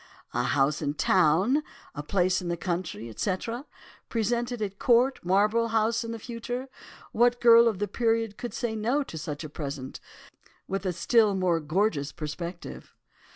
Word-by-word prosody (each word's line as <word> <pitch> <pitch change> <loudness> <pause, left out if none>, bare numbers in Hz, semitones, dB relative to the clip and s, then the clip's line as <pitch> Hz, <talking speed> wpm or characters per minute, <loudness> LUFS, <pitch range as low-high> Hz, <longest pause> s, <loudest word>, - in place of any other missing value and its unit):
"'A 120 - +1
house 135 +3 +1
in 145 -1 -2
town—a 185 - +1
place 185 +3 +1
in 180 - -5
the 170 0 -1
country, 175 -9 -3
etc., 210 - -3 0.4
presented 235 +2 -1
at 200 -2 -4
Court, 250 +2 +3
Marlborough 210 +5 +2
House 225 +1 +1
in 230 - -5
the 230 - -4
future—what 245 0 -3
girl 235 -1 +7
of 220 -4 0
the 205 +2 -1
period 225 0 0
could 240 - -6
say 235 -3 -2
no 240 +7 0
to 215 - -10
such 155 -1 -5
a 155 - -6
present—with 145 +6 -8
a - - +1
still 210 +4 +3
more 180 -3 +1
gorgeous 155 -2 0
perspective? 170 +3 -7
200 Hz, 150 wpm, -27 LUFS, 170-230 Hz, 0.4 s, girl